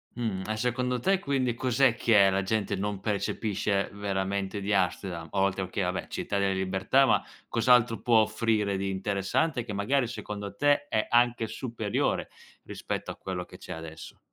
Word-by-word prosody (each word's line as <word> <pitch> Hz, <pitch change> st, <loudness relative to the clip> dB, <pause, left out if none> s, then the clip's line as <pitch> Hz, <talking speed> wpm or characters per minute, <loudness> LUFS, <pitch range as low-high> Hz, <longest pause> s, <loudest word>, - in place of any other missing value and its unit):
Mh, 110 Hz, -6 st, -2 dB
e 110 Hz, 0 st, -2 dB
secondo 125 Hz, +1 st, 0 dB
te 190 Hz, +9 st, +2 dB
quindi 135 Hz, -7 st, 0 dB
cos'è 125 Hz, 0 st, +2 dB
che 105 Hz, -5 st, +5 dB
la 95 Hz, +1 st, +1 dB
gente 105 Hz, 0 st, -1 dB
non 100 Hz, 0 st, -3 dB
percepisce, 100 Hz, -1 st, -1 dB
veramente, 100 Hz, 0 st, -2 dB
di 100 Hz, +1 st, -1 dB
Amsterdam? 90 Hz, -3 st, -1 dB
oltre, 95 Hz, -1 st, +1 dB
okay, 95 Hz, +1 st, -3 dB
vabbè 90 Hz, +1 st, -2 dB
città 100 Hz, -, -3 dB
delle 100 Hz, -1 st, +2 dB
libertà, 95 Hz, +8 st, +2 dB
ma -, -, +3 dB, 0.2 s
cos'altro 120 Hz, 0 st, +3 dB
può 120 Hz, -2 st, +4 dB
offrire 110 Hz, -2 st, +1 dB
di 95 Hz, 0 st, -2 dB
interessante 100 Hz, -, 0 dB
che 110 Hz, -, -7 dB
magari 120 Hz, +6 st, +1 dB
secondo 105 Hz, -3 st, -6 dB
te 145 Hz, +5 st, +2 dB
è 110 Hz, -, 0 dB
anche 120 Hz, -1 st, +3 dB
superiore 115 Hz, -4 st, -2 dB, 0.3 s
rispetto -, -, -5 dB
a -, -, -8 dB
quello 90 Hz, -2 st, -5 dB
che 90 Hz, -, -13 dB
c'è 90 Hz, -, -10 dB
adesso? 80 Hz, -2 st, -8 dB
105 Hz, 165 wpm, -28 LUFS, 95-120 Hz, 0.3 s, che